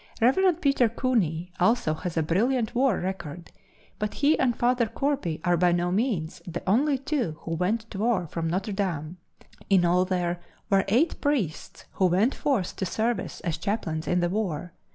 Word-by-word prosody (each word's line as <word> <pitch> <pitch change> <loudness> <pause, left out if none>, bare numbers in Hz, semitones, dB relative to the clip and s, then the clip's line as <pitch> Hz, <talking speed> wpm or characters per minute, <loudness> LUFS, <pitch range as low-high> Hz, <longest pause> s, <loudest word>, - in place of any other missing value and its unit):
Rev. 345 +9 +3
Peter 275 -7 +3
Cooney 185 - 0
also 185 -4 +2
has 165 +2 -5
a 160 - +3
brilliant 220 +9 +1
war 255 -4 +2
record, 175 -3 -5 0.5
but 210 0 -2
he 295 +2 +3
and 245 -3 +2
Father 245 -1 +2
Corby 250 - -1
are 175 -1 +3
by 175 +1 +3
no 175 +1 +1
means 190 -6 -1
the 175 0 -5
only 270 +8 +3
two 260 - -2
who 165 - -6
went 180 +7 0
to 195 - -6
war 215 -5 +1
from 165 +1 -3
Notre 190 +5 -2
Dame. 175 -4 -3 0.5
In 190 -3 +4
all 180 +2 +3
there 175 -2 -1 0.3
were 195 -1 +4
eight 260 - +2
priests 250 - -2
who 190 - +2
went 195 +9 +2
forth 240 -11 -1
to 190 - -1
service 225 +5 -2
as 165 -3 -2
chaplains 165 -5 -2
in 180 0 +2
the 175 - +1
war. 180 -4 -3
195 Hz, 175 wpm, -26 LUFS, 175-240 Hz, 0.5 s, In